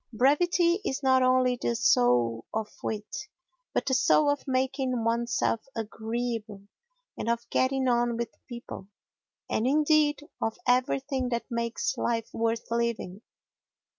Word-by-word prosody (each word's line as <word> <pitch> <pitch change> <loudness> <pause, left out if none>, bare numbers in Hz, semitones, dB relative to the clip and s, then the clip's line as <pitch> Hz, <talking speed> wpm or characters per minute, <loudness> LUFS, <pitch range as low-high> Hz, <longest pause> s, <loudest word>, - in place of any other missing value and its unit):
Brevity 340 - +3
is 270 -7 -3
not 260 -1 +4
only 255 -1 +3
the 235 - 0
soul 120 - +3
of 220 -1 -2
wit, 215 -1 -3 0.7
but - - -1
the 265 - 0
soul 290 +3 +4
of 285 0 -4
making 260 -2 0
oneself 235 0 0
agreeable 225 -1 -4 0.5
and - - -3
of 235 0 -1
getting 260 0 +1
on 240 -1 +2
with 235 0 -3 0.2
people, 235 -5 -8 0.6
and, 225 - 0
indeed, 300 +1 +3 0.2
of 225 - -1
everything 260 +1 +1
that 235 -1 -2
makes 235 0 -2
life 230 -1 -1
worth 230 0 -1
living. 235 -5 -2
240 Hz, 130 wpm, -28 LUFS, 225-265 Hz, 0.7 s, not